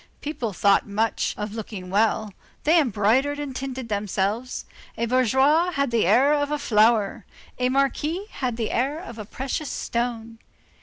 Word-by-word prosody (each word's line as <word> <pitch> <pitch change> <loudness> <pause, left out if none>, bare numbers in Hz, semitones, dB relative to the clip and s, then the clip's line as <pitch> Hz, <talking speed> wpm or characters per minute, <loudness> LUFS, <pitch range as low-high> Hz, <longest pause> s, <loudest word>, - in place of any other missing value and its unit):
People 270 -7 -3
thought 200 +2 +3
much 215 +2 -1
of 210 0 -4
looking 205 -4 -7
well. 215 0 +1 0.3
They 325 +3 +5
embroidered 255 +4 +1
and 285 -3 -5
tinted 260 -2 -5
themselves. 205 +3 -2 0.3
A 235 - 0
bourgeois 265 +7 +3
had 280 -4 0
the 225 -6 +2
air 260 +9 +5
of 290 -1 +1
a 300 - 0
flower, 220 -5 +2 0.4
a 250 0 +2
Marquis 285 +7 0
had 245 -4 -3
the 225 -2 -2
air 270 +5 0
of 235 -10 -9
a 210 - -6
precious 265 +6 -4
stone. 230 -1 -3
240 Hz, 155 wpm, -24 LUFS, 215-275 Hz, 0.4 s, They